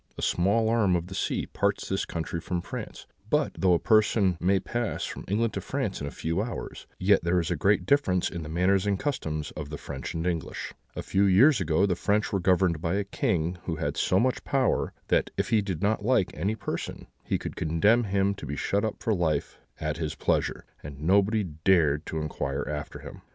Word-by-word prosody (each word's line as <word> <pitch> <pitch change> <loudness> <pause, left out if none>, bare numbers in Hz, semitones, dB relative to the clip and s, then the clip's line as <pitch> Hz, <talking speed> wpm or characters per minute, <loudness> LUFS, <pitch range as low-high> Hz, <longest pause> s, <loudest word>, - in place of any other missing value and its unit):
A - - -5
small 100 +6 +2
arm 110 -5 +3
of 85 -1 -1
the 95 - -9
sea 95 - -1
parts 100 0 -1
this 95 - -1
country 85 0 -4
from 90 0 -2
France; - - -7 0.2
but - - +2
though 90 -2 +3
a - - +4
person 105 -3 +3
may 95 +2 +3
pass 120 +3 -2
from - - -7
England 110 +3 0
to - - -3
France - - -3
in 70 - -3
a - - -2
few 85 +6 -2
hours, 115 +2 -6
yet 95 0 +3
there 85 +1 +2
is 85 0 -2
a - - +1
great 95 +7 +2
difference 95 -11 +2
in 85 - -5
the 75 - -7
manners 90 +4 +2
and 100 -1 +2
customs 80 - -3
of 75 -2 -7
the 75 - -5
French - - -6
and 80 +1 -2
English. 85 -4 -3 0.2
A - - -4
few 100 +1 +2
years 115 +7 +5
ago 85 +3 +2
the 95 -3 +1
French 105 +4 0
were 100 - +2
governed 90 -3 +2
by 85 +1 0
a 100 - +1
king 90 -3 -1
who 85 - -2
had 75 -2 -2
so 95 - +2
much 130 +2 +1
power, 135 -3 +1 0.2
that, - - +2
if - - 0
he 110 -2 +4
did 95 -5 -4
not 105 0 +1
like 105 -5 +2
any 100 +8 -1
person, 100 -3 -5 0.2
he - - 0
could - - -6
condemn 105 +10 +3
him 100 0 +1
to 100 - -9
be 70 - -3
shut 100 +7 0
up 110 - -3
for 115 - +2
life 80 -6 -1 0.2
at 75 -1 -2
his 80 -3 -3
pleasure, - - 0 0.2
and 70 -1 -9
nobody 100 +5 +3
dared 80 -2 +2
to 80 - -4
inquire 70 -3 -3
after 75 0 -5
him. - - -10
95 Hz, 220 wpm, -27 LUFS, 80-100 Hz, 0.2 s, years